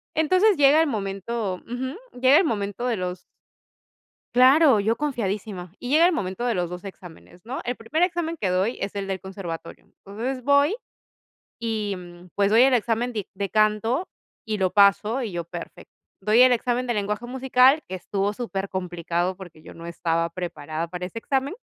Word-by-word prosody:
Entonces 370 +6 +3
llega 290 +2 +6
el 325 - +2
momento 195 -2 -3
Ujú, 260 +4 -4 0.2
llega 260 +3 +6
el - - +5
momento 210 -1 -2
de 235 - 0
los 180 -1 -4 1.2
Claro, 265 0 +6
yo 220 +3 +1
confiadísima. 205 - -3
Y 245 - -7
llega 315 +5 +5
el 360 - +3
momento 190 - -3
de 240 - +1
los 175 -1 -1
2 180 +2 -8
exámenes, 180 -2 -12
¿no? 250 +3 -4
El 245 - -2
primer 305 +10 -1
examen 340 -2 -1
que 200 - 0
doy 190 +6 0
es 200 - -4
el 200 -1 -3
del 190 -1 -3
conservatorio. 180 -4 -8
Entonces 240 +6 -6
voy 285 +5 +4 0.9
y, 220 -3 -2
mm, 175 0 -12
pues, 200 0 +2
doy 225 +3 +6
el 265 -1 +5
examen 235 +1 0
dic 210 -4 -4
de 200 0 -3
canto 215 - +1 0.4
y 215 -2 -2
lo 185 -1 +1
paso 210 +5 +4
y 225 - -3
yo: 175 -1 -4
"Perfecto". 170 0 -10 0.3
Doy 215 +5 +3
el 255 - +7
examen 245 +1 0
de 240 - +1
lenguaje 210 +2 -2
musical, 260 +3 +3
que 185 - -5
estuvo 195 +2 -2
super 200 -4 -4
complicado, 175 0 -2
porque 175 -5 -12
yo - - -12
no 170 0 -10
estaba 165 0 -1
preparada 165 -2 -5
para 180 +1 -5
ese 230 - -7
examen 270 +6 -1
210 Hz, 185 wpm, -24 LUFS, 185-255 Hz, 1.2 s, el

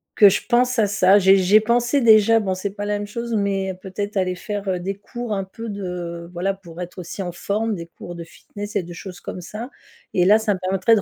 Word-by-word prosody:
que 205 -2 +8
je 200 - 0
pense 250 0 +3
à 210 - +4
ça. 200 0 +5
J'ai 195 0 +6
j'ai 195 +3 +5
pensé, 240 +5 +2
déjà, 225 -1 +6
bon 190 -3 -1
c'est 195 +2 -3
pas 205 +1 -5
la 205 0 0
même 205 - -4
chose, 235 +2 -4
mais 195 -2 0
peut-être 200 +1 -4
aller 185 -1 +1
faire, 205 +2 -5
heu, 180 -1 0
des 195 +3 -3
cours 240 +3 -7
un 195 -1 -1
peu 225 +4 -8
de 180 -4 -5
voilà, 185 +3 -1
pour 175 -2 -11
être 180 +2 -7
aussi 175 +3 -6
en 175 - -4
forme 210 +5 -2
des 170 -2 -6
cours 175 +1 -10
de 170 - -6
fitness 205 +5 -9
et 200 - +2
de 175 0 -9
choses 180 +1 -9
comme 180 - -6
ça 215 +8 -7 0.5
et 180 - +4
là, 210 +3 +6
ça 215 -2 +1
me - - -8
permettrait 190 +4 +3
de 210 - +1
200 Hz, 250 wpm, -22 LUFS, 185-215 Hz, 0.5 s, que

